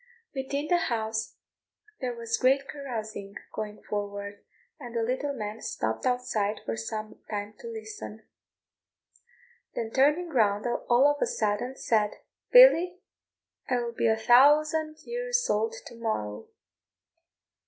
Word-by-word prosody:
Within 280 +2 -3
the 350 +1 +2
house 220 -1 -2 0.6
there 250 -2 -3
was 230 0 -2
great 275 +2 +3
carousing 220 -7 -6 0.2
going 210 -1 -6
forward, 205 0 -5 0.4
and 240 -4 -9
the 230 - +1
little 260 +5 -1
man 215 -2 -5
stopped 110 - -2
outside 225 -5 0
for 115 - -2
some 215 - -5
time 205 0 -4
to 470 - -8
listen; 430 - -8 1.5
then 225 -1 -3
turning 300 +7 +3
round 210 -7 +2
all 240 +2 +2
of 290 0 +1
a - - +3
sudden, 245 - -1
said, 215 -5 +1 0.4
"Billy, 365 -8 +8 0.7
I 255 - +2
will 240 -1 -2
be 230 - +1
a 220 0 +3
thousand 305 +6 +4
years 485 0 -1
old 450 +1 0
to - - -10
morrow!" 160 - -3
240 Hz, 130 wpm, -28 LUFS, 215-295 Hz, 1.5 s, Billy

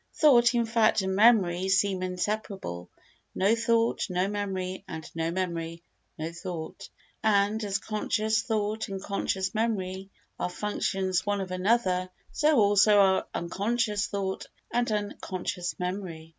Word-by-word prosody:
Thought, 245 -5 +5
in 235 -1 +2
fact, 220 -2 +3
and 190 0 -1
memory 190 -4 +4
seem 195 -1 +2
inseparable; 185 - -3 0.5
no 200 +4 +3
thought, 230 0 +1
no 180 +1 0
memory; 190 -2 -3
and 160 - -7
no 165 0 -1
memory, 170 -2 -3 0.3
no 160 +1 -4
thought. 170 -2 -7 0.3
And, 210 0 +2
as 200 -1 0
conscious 215 +1 0
thought 220 -2 -1
and 195 -1 -5
conscious 190 0 -2
memory 195 -4 -2 0.3
are - - -1
functions 190 -1 -1
one 205 0 0
of 190 -1 -4
another, 185 -1 +1 0.2
so 305 -1 +3
also 205 0 +5
are 190 -1 +4
unconscious 210 +4 -1
thought 195 -1 -3 0.3
and 240 -1 +1
unconscious 185 -3 -3
memory. 180 -3 -5
195 Hz, 130 wpm, -28 LUFS, 185-215 Hz, 0.5 s, Thought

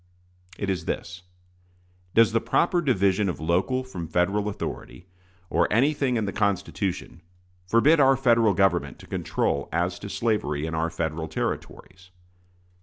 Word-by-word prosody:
It 100 - -3
is 85 -4 -3
this: 85 0 -4 0.9
Does 115 -1 +6
the 115 0 +1
proper 170 +9 +1
division 100 - +2
of 90 - -4
local 95 +11 0
from 90 -10 -7
Federal 95 +5 0
authority, 95 -2 -7 0.4
or - - +1
anything 135 +1 +2
in 110 - 0
the 100 - -4
Constitution, 100 -2 -2 0.5
forbid 135 - +4
our 135 -1 +5
Federal 115 -5 +3
Government 95 -3 +1
to - - -14
control 70 0 -2
as 90 +2 -1
to 100 - -7
slavery 100 -11 -1
in 80 - -4
our 80 +1 0
Federal 80 -1 -3
Territories? 90 +3 -5
100 Hz, 140 wpm, -25 LUFS, 85-115 Hz, 0.9 s, Does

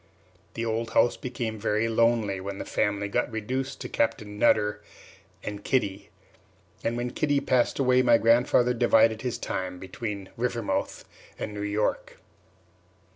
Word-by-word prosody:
The 115 - -2
old 115 0 -1
house 120 - +4
became 120 -3 -4
very 110 +1 +1
lonely 115 -3 +2
when 100 +1 -5
the - - -5
family 105 -1 0
got 120 +4 -1
reduced 130 +5 -3
to - - -4
Captain 105 -2 -1
Nutter 105 -1 +3 0.6
and 105 -1 -6
Kitty; 100 -7 -1 0.7
and 115 +1 -1
when 120 0 -2
Kitty 145 +2 +1
passed 125 -3 +1
away, 130 -2 +4
my 120 -2 +5
grandfather 120 +2 +3
divided 115 -2 +4
his 125 -2 -2
time 95 -5 -4
between 100 +1 -6
Rivermouth 120 -2 -2 0.3
and 105 - -5
New 105 - -5
York. 110 - -1
115 Hz, 140 wpm, -27 LUFS, 105-120 Hz, 0.7 s, my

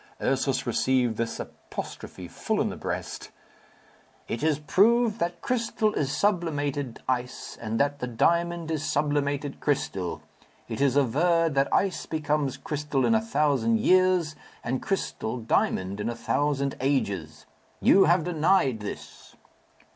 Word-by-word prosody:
Ursus - - 0
received 125 -4 +1
this 115 0 -2
apostrophe - - -8
full - - -2
in - - +1
the - - -5
breast, - - -5 1.0
"It 115 - -3
is 155 -1 +2
proved 220 - +3
that 175 0 -2
crystal 230 -4 0
is 140 -2 -1
sublimated 145 - -1
ice, 125 -1 -3
and 110 0 -2
that 145 +1 +1
the 125 - -3
diamond 170 +6 +1
is 155 -3 -1
sublimated 145 -1 -1
crystal. 95 - -2 0.4
It - - -4
is 140 -2 +3
averred 160 +5 +2
that 135 0 +1
ice 195 -3 +1
becomes 150 -3 -1
crystal 150 -3 -1
in - - +3
a 220 - +3
thousand 140 - +1
years, 185 +1 +3 0.3
and 125 +2 -2
crystal 125 - -2
diamond 100 -4 0
in 105 +3 -1
a 120 - -3
thousand 140 +2 0
ages. 100 - -1 0.3
You 195 -1 +6
have 170 -1 +3
denied 165 - +2
this." 105 0 -9
145 Hz, 135 wpm, -26 LUFS, 125-170 Hz, 1.0 s, You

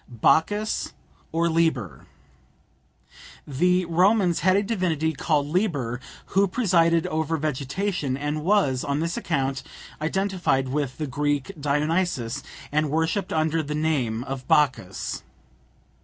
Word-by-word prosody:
BACCHUS 165 - +1 0.4
OR 165 +1 +1
LIBER. 160 - 0 1.4
The 180 +6 +2
Romans 180 +1 +3
had 185 +3 +3
a 200 - +3
divinity 170 -7 0
called 145 0 +1
Liber 145 - -1 0.3
who 195 +2 +4
presided 170 -6 +2
over 160 +1 -1
vegetation, 150 +1 -2
and 145 +2 -3
was, 165 -9 +2
on 140 +1 -1
this 165 +2 -1
account, 135 -4 -1 0.4
identified 175 -6 0
with 140 -1 -2
the 155 - -2
Greek 145 0 -1
Dionysus, 150 -3 0 0.3
and 155 0 +1
worshipped 165 +6 0
under 160 0 +1
the 150 0 -4
name 135 -8 0
of 135 -1 -6
Bacchus. 135 - +1
155 Hz, 115 wpm, -25 LUFS, 140-180 Hz, 1.4 s, who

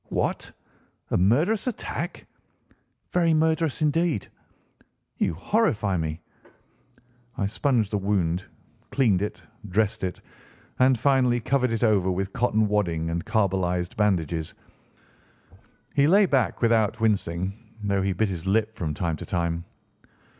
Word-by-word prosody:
"What! - - -2 0.6
a - - +3
murderous 150 - +2
attack?" 250 - -4 0.9
"Very 170 -2 +3
murderous 160 -1 +1
indeed." 155 - +1 0.9
"You - - +1
horrify 105 - +1
me." 80 -1 -3 1.2
I 100 - 0
sponged 110 0 0
the 105 - 0
wound, 95 -3 0 0.5
cleaned 110 -9 +2
it, 105 - -4 0.3
dressed 110 +2 0
it, 90 -2 -3 0.6
and 130 0 +5
finally 125 -1 +3
covered 125 +2 +1
it 115 +1 -1
over 100 -5 +3
with 95 +1 -2
cotton 110 -3 +2
wadding 85 -6 0
and 85 0 -2
carbolised 90 -4 0
bandages. 85 -6 0 1.4
He 140 0 +4
lay 200 +5 +6
back 135 - 0
without 115 -1 +2
wincing, 95 -4 0 0.3
though 100 -1 +1
he 95 0 0
bit 110 +4 +1
his 90 -1 -5
lip 110 +2 +1
from 80 -8 -3
time 85 -1 -2
to - - -7
time. 85 -1 -1
105 Hz, 125 wpm, -25 LUFS, 90-125 Hz, 1.4 s, lay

